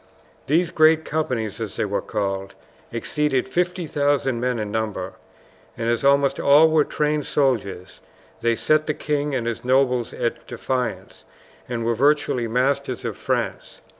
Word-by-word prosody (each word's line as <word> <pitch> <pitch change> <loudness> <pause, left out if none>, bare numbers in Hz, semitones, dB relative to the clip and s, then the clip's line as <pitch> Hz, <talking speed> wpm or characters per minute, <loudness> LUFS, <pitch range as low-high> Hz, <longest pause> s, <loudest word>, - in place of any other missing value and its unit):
These 170 +4 +2
"great 160 -1 +4
companies," 125 -9 -2
as - - -4
they - - -1
were - - -1
called, 95 -1 -3 0.4
exceeded 135 +3 -1
50,000 145 -5 0
men 125 0 0
in 105 -2 -4
number, 105 -4 -3 0.6
and 115 0 0
as 120 - -1
almost 140 0 +3
all 150 +3 +6
were 155 -1 +4
trained 150 0 -1
soldiers 105 -9 -1 0.4
they 115 0 +2
set 155 +5 +1
the 155 - 0
king 145 -1 -1
and 120 -3 -2
his 115 -1 -3
nobles 125 -2 +2
at 120 - -3
defiance, 120 -6 -4 0.5
and 115 -2 -3
were 115 - +2
virtually 135 -1 +2
masters 130 +2 0
of - - -3
France. - - -3
130 Hz, 145 wpm, -23 LUFS, 115-150 Hz, 0.6 s, all